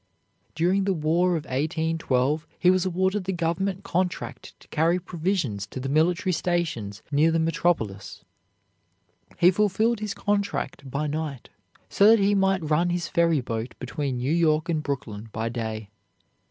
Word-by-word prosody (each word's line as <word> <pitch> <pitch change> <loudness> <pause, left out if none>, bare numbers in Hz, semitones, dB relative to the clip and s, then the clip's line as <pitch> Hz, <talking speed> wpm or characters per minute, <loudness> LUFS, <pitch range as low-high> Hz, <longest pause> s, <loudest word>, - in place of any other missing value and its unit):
During 180 +5 +2
the 195 -1 +1
War 170 +3 +2
of 155 - -6
1812 155 -1 0
he 180 - +5
was 185 0 +1
awarded 190 +2 0
the 190 - -1
Government 180 +3 -1
contract 180 -1 -3
to - - -19
carry 165 +3 +2
provisions 170 - -2
to 130 - -7
the 135 +1 -4
military 165 +5 +2
stations 160 - -2
near 150 +3 +4
the 165 - +2
metropolis. 160 - -1 1.1
He 175 +1 +6
fulfilled 210 +4 +1
his 210 -1 -4
contract 200 -9 -2
by 140 +4 -2
night 150 -4 -4 0.4
so 200 - +4
that 225 +1 +8
he 200 0 +3
might 195 -4 +1
run 165 +4 +2
his 175 -1 -2
ferry 165 -4 +2
boat 115 0 -4
between 130 0 -3
New 130 +5 0
York 160 -1 +2
and 160 -2 +1
Brooklyn 115 -7 -5
by 110 +2 -2
day. 110 -3 -5
165 Hz, 155 wpm, -25 LUFS, 140-185 Hz, 1.1 s, that